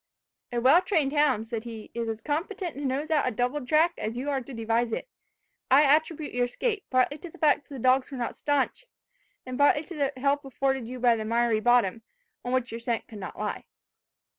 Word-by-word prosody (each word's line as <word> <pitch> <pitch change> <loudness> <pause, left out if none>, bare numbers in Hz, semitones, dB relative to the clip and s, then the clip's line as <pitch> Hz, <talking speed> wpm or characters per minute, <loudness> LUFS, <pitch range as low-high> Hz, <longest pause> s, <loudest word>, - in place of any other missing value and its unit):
"A 240 - 0
well 270 +9 +6
trained 320 -7 +1
hound," 290 -7 +2
said 225 -1 -4
he, 225 -2 -9
"is 230 -1 -3
as 220 0 -4
competent 340 +3 -3
to 285 - -7
nose 275 +4 -2
out 300 -4 +2
a - - +1
doubled 250 +4 -2
track 320 +5 +4
as 225 +2 -3
you 275 +4 -2
are 270 -1 0
to 255 - -11
devise 230 0 0
it. 360 - -3 0.6
I 275 +3 +7
attribute 305 +1 +2
your 245 0 +2
escape, 415 - -2
partly 255 +3 +2
to 350 - -9
the - - -15
fact 300 -1 +2
that 280 - -8
the - - -6
dogs 255 +3 +2
are 270 - -5
not 240 - -3
staunch, 290 - -1 0.6
and 255 +1 -6
partly 290 +1 +4
to 350 - -9
the 285 -2 0
help 280 +2 +1
afforded 270 -2 -1
you 250 +1 -7
by 240 -1 +4
the 220 - -3
miry 230 0 +1
bottom, 230 -3 +3 0.4
on 245 - -4
which 255 -2 0
your 230 - -5
scent 230 -1 -2
could 215 - -10
not 190 - -7
lie." - - -4
260 Hz, 220 wpm, -27 LUFS, 235-295 Hz, 0.6 s, I